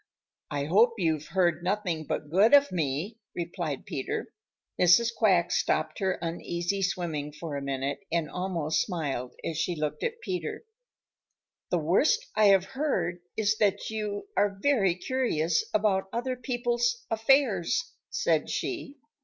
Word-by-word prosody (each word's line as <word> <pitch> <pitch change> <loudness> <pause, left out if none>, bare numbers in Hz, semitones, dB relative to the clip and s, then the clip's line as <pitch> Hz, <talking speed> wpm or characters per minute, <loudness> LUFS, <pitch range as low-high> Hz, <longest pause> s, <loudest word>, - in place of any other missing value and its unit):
"I 140 -1 -2
hope 215 +9 +4
you've 160 -5 0
heard 175 -3 +1
nothing 180 -5 -1
but 150 +1 -4
good 210 - +6
of 285 0 +5
me," 165 - -2 0.2
replied 170 -4 -4
Peter. 135 - -4 0.5
Mrs. 180 +7 +6
Quack 185 -6 +3
stopped - - 0
her 190 -1 0
uneasy 175 +3 -2
swimming 170 -6 -2
for 150 0 -6
a 140 - -3
minute 140 0 -2
and 165 -2 0
almost 165 -1 -1
smiled 145 - -3
as 165 -1 -2
she 175 +1 0
looked 150 -1 -3
at 470 0 -2
Peter, 375 -2 -4 1.1
"The 180 - +2
worst 235 - +2
I 215 - +4
have 195 -2 +5
heard 190 - -1 0.2
is 215 0 +1
that 205 0 +1
you 210 - -3
are 200 -1 +2
very 205 -9 +3
curious 175 -7 0
about 200 -3 +1
other 250 +2 -2
people's 240 -1 -1
affairs," 225 - +2 0.2
said - - +1
she. 320 -6 -4
190 Hz, 140 wpm, -28 LUFS, 165-230 Hz, 1.1 s, good